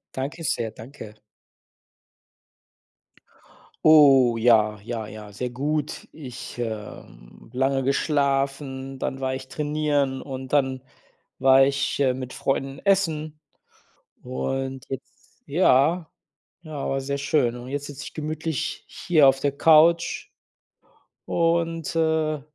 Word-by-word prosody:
Danke 145 Hz, +5 st, -4 dB
sehr, 115 Hz, -6 st, -1 dB
danke. 110 Hz, -2 st, -11 dB, 2.7 s
Oh 135 Hz, -6 st, +7 dB
ja, 110 Hz, -2 st, +3 dB
ja, 115 Hz, 0 st, -5 dB
ja, 105 Hz, -1 st, -10 dB
sehr 125 Hz, +5 st, -4 dB
gut. 145 Hz, +3 st, -3 dB
Ich, 130 Hz, -7 st, -9 dB
ähm 105 Hz, -, -8 dB
lange 135 Hz, +1 st, +1 dB
geschlafen, 135 Hz, -1 st, -1 dB
dann 135 Hz, -, -3 dB
war 130 Hz, 0 st, -1 dB
ich 130 Hz, 0 st, -8 dB
trainieren 145 Hz, -3 st, -1 dB
und 130 Hz, -1 st, -7 dB
dann 130 Hz, -3 st, +1 dB, 0.6 s
war 135 Hz, 0 st, +6 dB
ich, 140 Hz, +1 st, 0 dB
äh, 130 Hz, -2 st, +3 dB
mit 130 Hz, -1 st, -7 dB
Freunden 135 Hz, 0 st, -2 dB
essen 160 Hz, -6 st, 0 dB, 0.8 s
und 135 Hz, +1 st, -4 dB
jetzt 135 Hz, -, -10 dB
ja. 160 Hz, +2 st, +3 dB, 0.5 s
Ja, 155 Hz, -3 st, -5 dB
war 135 Hz, -, 0 dB
sehr 140 Hz, +1 st, -3 dB
schön 140 Hz, -4 st, +1 dB
und 125 Hz, +1 st, -9 dB
jetzt 145 Hz, +1 st, -3 dB
sitze 145 Hz, +1 st, -8 dB
ich -, -, -9 dB
gemütlich 155 Hz, 0 st, -4 dB
hier 155 Hz, -5 st, +3 dB
auf 135 Hz, -, 0 dB
der 140 Hz, 0 st, 0 dB
Couch 165 Hz, +2 st, +4 dB, 1.0 s
und, 165 Hz, -1 st, 0 dB
äh 160 Hz, -2 st, +1 dB
135 Hz, 115 wpm, -24 LUFS, 130-155 Hz, 2.7 s, Oh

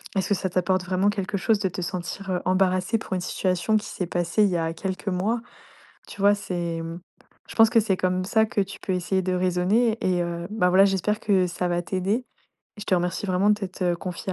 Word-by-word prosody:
est 195 Hz, -, +3 dB
ce -, -, -5 dB
que -, -, +4 dB
ça 190 Hz, 0 st, -2 dB
t'apporte 185 Hz, +1 st, +1 dB
vraiment 185 Hz, +2 st, +1 dB
quelque 200 Hz, -1 st, -2 dB
chose 215 Hz, +3 st, +2 dB
de 195 Hz, -2 st, 0 dB
te 180 Hz, -, -5 dB
sentir, 180 Hz, +2 st, -5 dB
heu, 180 Hz, -, -1 dB
embarrassé 185 Hz, +3 st, +2 dB
pour 215 Hz, -, -6 dB
une 185 Hz, -, -1 dB
situation 185 Hz, +3 st, 0 dB
qui 210 Hz, -, -4 dB
s'est 180 Hz, -, -4 dB
passée 175 Hz, +4 st, +1 dB
il 205 Hz, -, +4 dB
y 180 Hz, -, 0 dB
a 165 Hz, -1 st, -1 dB
quelques 190 Hz, +3 st, -5 dB
mois? 200 Hz, +5 st, 0 dB, 0.7 s
Tu -, -, -11 dB
vois, 200 Hz, +1 st, +5 dB
c'est, 170 Hz, -4 st, -3 dB
mmh 165 Hz, +1 st, -6 dB, 0.5 s
je -, -, -9 dB
pense 225 Hz, -1 st, +6 dB
que 230 Hz, -, +5 dB
c'est 205 Hz, -3 st, 0 dB
comme 185 Hz, 0 st, 0 dB
ça 220 Hz, +3 st, +3 dB
que 215 Hz, -, -1 dB
tu 195 Hz, 0 st, -3 dB
peux 190 Hz, -, -3 dB
essayer 185 Hz, +1 st, 0 dB
de 185 Hz, 0 st, -1 dB
raisonner. 185 Hz, +6 st, +2 dB
Et 180 Hz, -1 st, +2 dB
heu, 170 Hz, 0 st, -4 dB
ben, 210 Hz, -4 st, +2 dB
voilà, 190 Hz, +2 st, +6 dB
j'espère 200 Hz, +2 st, +1 dB
que 190 Hz, -3 st, +2 dB
ça 180 Hz, 0 st, -2 dB
va 175 Hz, 0 st, 0 dB
t'aider. 195 Hz, +7 st, -1 dB, 0.5 s
Et -, -, -10 dB
je -, -, -6 dB
te -, -, +3 dB
remercie 180 Hz, +2 st, -1 dB
vraiment 185 Hz, +2 st, +2 dB
de -, -, +5 dB
t'être 185 Hz, -3 st, -2 dB
confié 185 Hz, +1 st, -5 dB
185 Hz, 240 wpm, -25 LUFS, 180-205 Hz, 0.7 s, pense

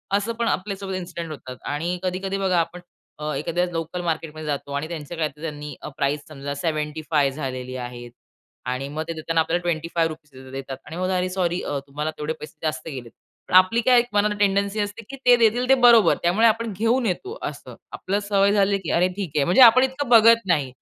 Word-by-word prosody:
असं 205 Hz, +3 st, -1 dB
पण 230 Hz, 0 st, -2 dB
आपल्यासोबत 190 Hz, +4 st, -2 dB
इन्सिडंट 170 Hz, -3 st, -6 dB
होतात. 130 Hz, -4 st, -8 dB
आणि 170 Hz, +5 st, -2 dB
कधी-कधी 190 Hz, +1 st, -2 dB
बघा 190 Hz, -3 st, +1 dB
आपण 170 Hz, +2 st, -3 dB, 0.4 s
अ, 150 Hz, 0 st, -3 dB
एखाद्या 175 Hz, +2 st, -1 dB
लोकल 165 Hz, +1 st, -4 dB
मार्केटमध्ये 160 Hz, -2 st, -4 dB
जातो 145 Hz, -1 st, -3 dB
आणि 150 Hz, +2 st, -3 dB
त्यांच्या 165 Hz, 0 st, -7 dB
काहीतर 150 Hz, -2 st, -3 dB
त्यांनी 150 Hz, -2 st, -6 dB
अ, -, -, -6 dB
प्राईस 140 Hz, +2 st, 0 dB
समजा 140 Hz, -2 st, -6 dB
75 150 Hz, -2 st, -1 dB
झालेली 130 Hz, -3 st, -5 dB
आहे. 120 Hz, -1 st, -7 dB, 0.6 s
आणि 130 Hz, +2 st, -3 dB
मग 155 Hz, -, -2 dB
ते 165 Hz, -, -3 dB
देताना 165 Hz, +1 st, -1 dB
आपल्याला 175 Hz, +2 st, -1 dB
25 165 Hz, -1 st, -1 dB
रुपीजच 145 Hz, -5 st, -12 dB
देतात. 135 Hz, 0 st, -6 dB
आणि 160 Hz, -, -8 dB
मग, 185 Hz, +1 st, -1 dB
"अरे 185 Hz, 0 st, 0 dB
सॉरी 180 Hz, -1 st, -1 dB
अ, 145 Hz, -, -2 dB
तुम्हाला 150 Hz, +3 st, -3 dB
तेवढे 150 Hz, +1 st, -3 dB
पैसे 150 Hz, -, -10 dB
जास्त 155 Hz, -2 st, -3 dB
गेलेत." 130 Hz, -6 st, -7 dB, 0.4 s
पण -, -, 0 dB
आपली 185 Hz, +6 st, +6 dB
काय 250 Hz, 0 st, +5 dB
एक 240 Hz, -, -1 dB
मनानं 210 Hz, 0 st, +2 dB
टेंडन्सी 200 Hz, +1 st, +1 dB
असते 205 Hz, +2 st, -3 dB
की 275 Hz, -, -6 dB
ते 245 Hz, 0 st, +8 dB
देतील 235 Hz, +2 st, +2 dB
ते 270 Hz, -, +7 dB
बरोबर. 230 Hz, -7 st, +6 dB
त्यामुळे 200 Hz, +7 st, +4 dB
आपण 225 Hz, 0 st, 0 dB
घेऊन 230 Hz, +3 st, +2 dB
येतो, 385 Hz, -, -3 dB
असं. -, -, -7 dB, 0.2 s
आपल्याला 200 Hz, +2 st, -3 dB
सवय 200 Hz, -1 st, +3 dB
झाली 200 Hz, -1 st, +3 dB
की 175 Hz, -, -4 dB
"अरे 180 Hz, +2 st, +3 dB
ठीक 190 Hz, -7 st, -4 dB
आहे." 145 Hz, -, +3 dB
म्हणजे 180 Hz, +9 st, +4 dB
आपण 245 Hz, +2 st, +8 dB
इतकं 265 Hz, 0 st, -2 dB
बघत 230 Hz, -1 st, +6 dB
नाही. 150 Hz, -7 st, +1 dB
170 Hz, 205 wpm, -23 LUFS, 150-200 Hz, 0.6 s, ते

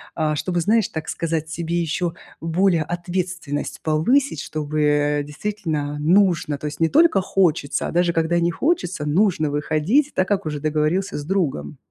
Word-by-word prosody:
а, 155 Hz, -2 st, 0 dB
чтобы, 175 Hz, +2 st, -1 dB
знаешь, 215 Hz, +3 st, +2 dB
так 160 Hz, 0 st, -5 dB
сказать, 165 Hz, -2 st, -2 dB
тебе 170 Hz, +1 st, -2 dB
ещё 170 Hz, +1 st, -1 dB, 0.3 s
более 165 Hz, +1 st, +2 dB
ответственность 175 Hz, -3 st, -4 dB
повысить, 165 Hz, -, +2 dB
чтобы, 155 Hz, 0 st, -3 dB
э, 145 Hz, 0 st, +2 dB
действительно 150 Hz, -3 st, -3 dB
нужно, 170 Hz, -2 st, +2 dB
то 150 Hz, -, -5 dB
есть 150 Hz, +1 st, -7 dB
не 165 Hz, -, +3 dB
только 320 Hz, -, +5 dB
хочется, 170 Hz, -6 st, +1 dB
а -, -, -5 dB
даже 175 Hz, 0 st, +2 dB
когда 165 Hz, +1 st, +1 dB
не 170 Hz, 0 st, +1 dB
хочется, 190 Hz, -, -1 dB
нужно 160 Hz, -1 st, +2 dB
выходить, 155 Hz, -, +1 dB
так 185 Hz, -, +1 dB
как 200 Hz, -4 st, 0 dB
уже 150 Hz, -1 st, -3 dB
договорился 155 Hz, +6 st, 0 dB
с 145 Hz, -, -6 dB
другом. 150 Hz, -, -2 dB
165 Hz, 160 wpm, -22 LUFS, 150-185 Hz, 0.3 s, только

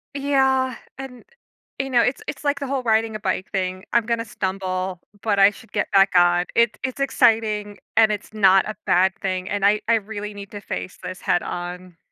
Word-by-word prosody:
Yeah, 265 Hz, -2 st, +1 dB, 0.2 s
and, 260 Hz, -2 st, -8 dB, 0.6 s
eh, -, -, +1 dB
you -, -, -6 dB
know, 245 Hz, -2 st, +4 dB
it's 250 Hz, -, -1 dB
it's -, -, -6 dB
like 285 Hz, -1 st, 0 dB
the 280 Hz, -, -4 dB
whole 265 Hz, -1 st, -2 dB
riding 220 Hz, -1 st, +1 dB
a -, -, -4 dB
bike 190 Hz, -2 st, -2 dB
thing. 185 Hz, -1 st, -2 dB
I'm 235 Hz, -2 st, +3 dB
gonna 230 Hz, -1 st, -1 dB
stumble, 185 Hz, -3 st, -3 dB, 0.2 s
but 205 Hz, -3 st, +1 dB
I 195 Hz, +1 st, +8 dB
should 220 Hz, +2 st, -15 dB
get 205 Hz, -, -1 dB
back 195 Hz, -1 st, +5 dB
on. 175 Hz, 0 st, +4 dB
It 235 Hz, -1 st, +3 dB
it's 260 Hz, +1 st, -4 dB
exciting 220 Hz, -6 st, +1 dB, 0.2 s
and 220 Hz, -1 st, +6 dB
it's 210 Hz, 0 st, -5 dB
not 195 Hz, -3 st, +4 dB
a 215 Hz, -, -5 dB
bad 190 Hz, +2 st, +3 dB
thing, 185 Hz, -1 st, -2 dB
and 200 Hz, -1 st, 0 dB
I 210 Hz, +1 st, +3 dB
I 230 Hz, -, +4 dB
really 210 Hz, -1 st, -5 dB
need 200 Hz, 0 st, -9 dB
to 205 Hz, -, -8 dB
face 185 Hz, -, -6 dB
this 185 Hz, 0 st, -7 dB
head 175 Hz, -, +1 dB
on. 175 Hz, 0 st, -6 dB
210 Hz, 210 wpm, -22 LUFS, 190-235 Hz, 0.6 s, I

